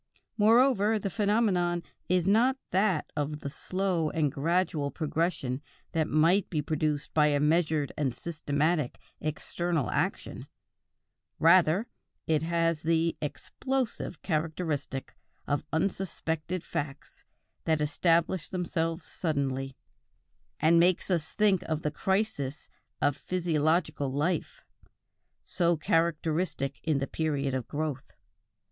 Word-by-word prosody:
Moreover, 225 -1 +4
the 200 -2 -3
phenomenon 200 -5 +1 0.3
is 180 -1 +2
not 235 +7 +4
that 190 -4 +1
of 150 0 -2
the 140 - -4
slow 185 0 -1
and 150 -3 0
gradual 160 0 0
progression 150 -3 -1 0.3
that 160 -1 +1
might 165 +7 +3
be 155 - -1
produced 150 0 -1
by 150 -1 +5
a 145 -1 +2
measured 155 -1 +2
and 140 -4 0
systematic 150 0 -1 0.2
external 160 -1 -2
action; - - -2 0.9
rather 170 +4 +5 0.4
it 155 -2 +2
has 165 -1 +1
the 165 +1 +1
"explosive" 255 - -3
character 160 0 -1 0.7
of 145 -1 -1
unsuspected 170 -1 -2
facts 140 -1 -5 0.4
that 160 -1 +2
establish 165 +3 +1
themselves 165 -2 -2
suddenly, 135 -5 -2 0.8
and 165 +2 +5
make 180 +1 +3
us 165 -3 0
think 205 -4 +3
of 155 0 -1
the 150 - 0
crises 155 -5 -1 0.3
of 145 - +3
physiological 160 -4 0
life, 150 +7 -1 0.8
so 170 -2 +1
characteristic 165 -2 0
in 155 -3 +1
the 135 - 0
period 145 -3 -1
of 130 -3 -2
growth. 150 -2 -4
160 Hz, 110 wpm, -29 LUFS, 150-180 Hz, 0.9 s, by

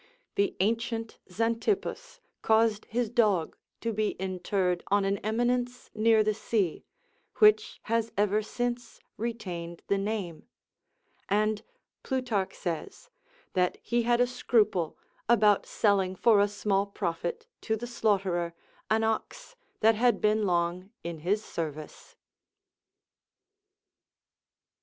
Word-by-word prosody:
The 200 - +1
ancient 225 +2 -1
Xantippus 370 - -1 0.2
caused 220 -1 +3
his 240 +1 -1
dog 210 -9 +2 0.3
to 230 -1 -1
be 215 0 0
interred 185 -1 -1
on 200 0 +2
an 195 0 0
eminence 245 +3 -1
near 220 0 +4
the 215 0 +1
sea, 205 -5 -1 0.5
which 425 -1 +4
has 230 0 0
ever 205 +1 +2
since 240 +1 -4 0.2
retained 180 -7 -5
the 200 - +2
name, 195 -5 -4 0.8
and 215 +1 +1 0.4
Plutarch 245 -7 -1
says, 370 - -5 0.4
that 180 -1 +1
he 240 0 +1
had 240 +1 +2
a 245 - +5
scruple 220 -8 +1 0.3
about 210 -4 +4
selling 195 -3 +2
for 210 +1 +5
a 205 - +4
small 200 -1 0
profit 200 - -3 0.2
to 220 - 0
the 230 +2 -5
slaughterer 190 -7 0 0.3
an 220 +1 +2
ox - - -3 0.3
that 225 +1 +6
had 240 +2 +2
been 215 0 +2
long 175 +1 0
in 170 -1 -5
his 200 +7 0
service. 155 -2 -6
215 Hz, 115 wpm, -29 LUFS, 190-230 Hz, 0.8 s, that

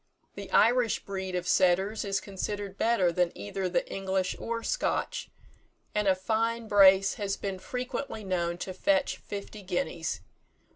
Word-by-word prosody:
The - - -8
Irish 235 0 +3
breed 190 -2 -4
of 180 0 -2
setters 190 +4 +3
is 195 -2 0
considered 200 0 -5
better 200 -5 +2
than 175 0 +1
either 180 - -3
the 180 - 0
English 190 -1 -1
or 230 0 -3
Scotch, - - -1 0.6
and 210 -1 +1
a 190 - +5
fine 225 +4 -1
brace 195 -2 +6
has 195 -1 -1
been 195 -2 -4
frequently 250 0 -4
known 175 -3 -1
to 185 - -6
fetch 285 +8 +1
fifty 205 +1 -7
guineas. 190 +8 -2
195 Hz, 145 wpm, -29 LUFS, 185-220 Hz, 0.6 s, brace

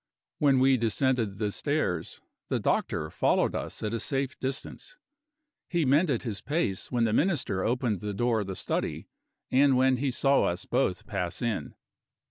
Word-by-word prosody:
When 140 -3 +4
we 130 0 +4
descended 115 -2 0
the 105 -1 -1
stairs, 140 - -2 0.3
the - - 0
doctor - - -1
followed - - +2
us - - -4
at 105 +1 -2
a 115 - -1
safe 135 0 -1
distance. 135 - -4 0.7
He 170 -3 +1
mended 140 -1 +2
his 110 -6 -4
pace 145 - -1
when 120 -2 +1
the 110 -2 +1
Minister 130 - +1
opened 120 -4 0
the 105 +2 -4
door 120 +1 +1
of 100 - -5
the 95 - -4
study, - - -3 0.4
and 135 0 +4
when 130 0 +3
he 135 +2 0
saw 135 +2 +3
us 85 - -2
both - - 0
pass 90 +4 -3
in. 105 - -2
125 Hz, 165 wpm, -28 LUFS, 105-135 Hz, 0.7 s, When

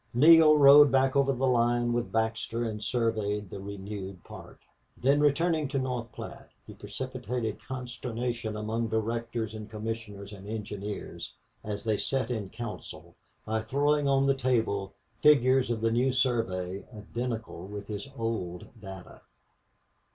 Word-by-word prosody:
Neale 155 +3 +8
rode 145 0 +9
back 135 0 +3
over 140 0 +4
the 135 0 0
line 120 -1 +2
with 120 0 -1
Baxter 115 +1 -1
and 110 -2 -4
surveyed 105 -3 -1
the - - -6
renewed 100 -1 -7
part. - - -11 0.4
Then, 140 +3 +3
returning 155 +1 +2
to 135 +1 -2
North 125 -3 -2
Platte, - - -9 0.2
he - - -10
precipitated 115 -1 -4
consternation 120 -3 -4
among 110 +2 -2
directors 115 0 -2
and 110 -1 -8
commissioners 105 -2 -6
and 100 0 -10
engineers, 105 -2 -6 0.3
as 105 -1 -4
they 110 -2 +1
sat 130 0 -1
in 105 -5 -3
council, 115 0 -8 0.3
by 110 0 -1
throwing 145 +5 +1
on 135 0 +3
the 135 - +4
table 115 -7 0 0.3
figures 130 -4 +5
of 115 -2 -1
the 115 0 +2
new 125 +3 +2
survey 100 -8 0
identical 115 -3 -5
with 100 0 -7
his 105 +6 -6
old 110 -7 -3
data. 95 -2 -10
115 Hz, 140 wpm, -29 LUFS, 105-130 Hz, 0.4 s, rode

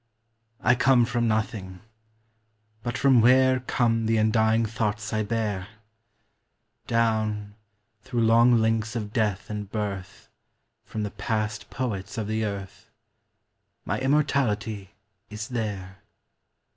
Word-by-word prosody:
I 120 - +4
come 125 -1 +4
from 120 0 0
nothing; 105 -4 -2 1.0
but 120 +2 -3
from 130 -4 +5
where 130 +2 +5
Come 115 -2 0
the 115 0 +2
undying 110 +1 +3
thoughts 105 -2 -2
1 110 -1 0
bear? 105 -4 -2 1.2
Down, 110 -3 0 0.5
through 120 +2 -2
long 115 +2 +5
links 110 0 0
of 105 -2 -4
death 105 -4 0
and 105 -2 -5
birth, 100 -3 -5 0.6
From 110 - -4
the 105 - -3
past 105 -2 -3
poets 110 -3 -4
of 110 - -2
the 110 +1 -1
earth. 100 -2 -6 1.0
My - - -1
immortality 125 -8 0 0.3
is 105 +4 -6
there. 100 -6 -4
110 Hz, 115 wpm, -26 LUFS, 105-120 Hz, 1.2 s, from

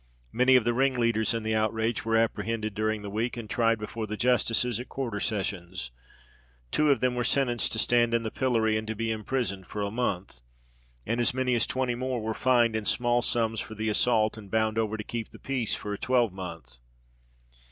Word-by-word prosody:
Many 125 +2 +4
of 125 - +5
the 120 +1 +1
ringleaders 120 -4 +2
in 115 - -2
the 110 0 -1
outrage 110 +1 0
were 115 0 +2
apprehended 110 -1 -1
during 110 0 -1
the 100 - -5
week, 115 +4 -2
and 115 -2 -6
tried 115 0 +2
before 110 +1 -5
the 105 +1 -4
justices 120 -1 +2
at 125 - -7
quarter 120 -6 -3
sessions. 95 - -3 0.8
Two 150 -1 +3
of 135 -5 +3
them 125 -1 +2
were 125 0 -1
sentenced 125 -2 +1
to - - -2
stand 120 0 +3
in 115 - +1
the 110 - -3
pillory 115 -4 +1
and 110 0 -4
to 110 - -3
be 115 +1 -1
imprisoned 110 -4 -2
for 105 - -4
a 100 - -2
month; 100 - -3 0.6
and 115 +2 0
as 120 - +2
many 130 -1 +1
as 115 - +2
twenty 130 -1 0
more 130 0 -2
were 110 0 -2
fined 120 -2 +3
in 110 -1 -2
small 120 +1 +2
sums 115 -2 0
for 110 - -6
the 110 +1 -1
assault, 110 0 +2
and 100 -2 -12
bound 110 +1 +1
over 110 -1 -1
to 105 - -5
keep 115 +1 -5
the - - -13
peace 130 -5 -1
for 105 - -5
a 100 - -5
twelvemonth. 90 - -1
115 Hz, 205 wpm, -28 LUFS, 110-120 Hz, 0.8 s, of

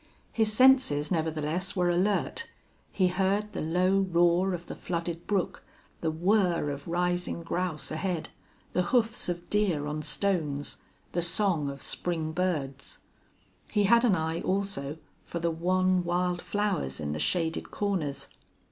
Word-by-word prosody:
His 220 -2 +3
senses, 215 - +5
nevertheless, 160 +3 -1
were 180 -2 +2
alert. 200 - 0 0.4
He 185 -2 +2
heard 195 +3 0
the - - -3
low 180 +4 +2
roar 175 0 +3
of 175 0 -8
the - - -6
flooded 170 -1 -4
brook, 200 -3 -1 0.4
the 165 - 0
whir 175 -2 +2
of 140 0 -7
rising 175 0 -1
grouse 175 -1 -1
ahead, 170 +1 -2 0.4
the 180 - +2 0.2
hoofs 225 -4 0
of 175 0 -4
deer 190 -8 +1
on 150 +1 -3
stones, 155 -5 -1 0.3
the 175 - 0
song 170 -4 +1
of 140 0 -7
spring 165 -3 -2
birds. 150 -6 -2 0.7
He 210 -2 +1
had 235 +4 +5
an 225 -6 +4
eye 160 0 -1
also 185 -7 -2 0.3
for - - -6
the 170 0 0
wan 185 +2 +2
wild 175 0 0
flowers 200 - -1
in 75 -1 -3
the 75 - -3
shaded 165 - 0
corners. 150 -9 -2
175 Hz, 145 wpm, -29 LUFS, 160-195 Hz, 0.7 s, senses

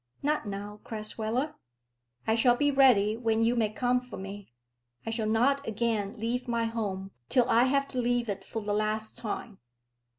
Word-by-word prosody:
"Not 295 -5 0
now, 205 +1 -6
Crasweller." 225 +6 +1 0.7
"I 220 - +2
shall 240 +2 +4
be 290 +3 +2
ready 240 -7 +5
when 225 -1 +1
you 235 +2 +2
may 220 -3 +2
come 250 +3 +1
for 250 -2 -10
me. 195 -3 -8 0.5
I 225 - -2
shall 220 -1 -1
not 275 +6 +2
again 220 -1 -1
leave 240 +3 -2
my 235 -1 0
home 200 -4 -3 0.2
till 250 -2 +4
I 235 +2 +4
have 275 +1 +1
to 255 - -2
leave 245 0 +1
it 200 -2 -4
for 225 - -5
the 205 0 -1
last 215 +1 -1
time. 215 -1 -5
225 Hz, 175 wpm, -29 LUFS, 210-245 Hz, 0.7 s, ready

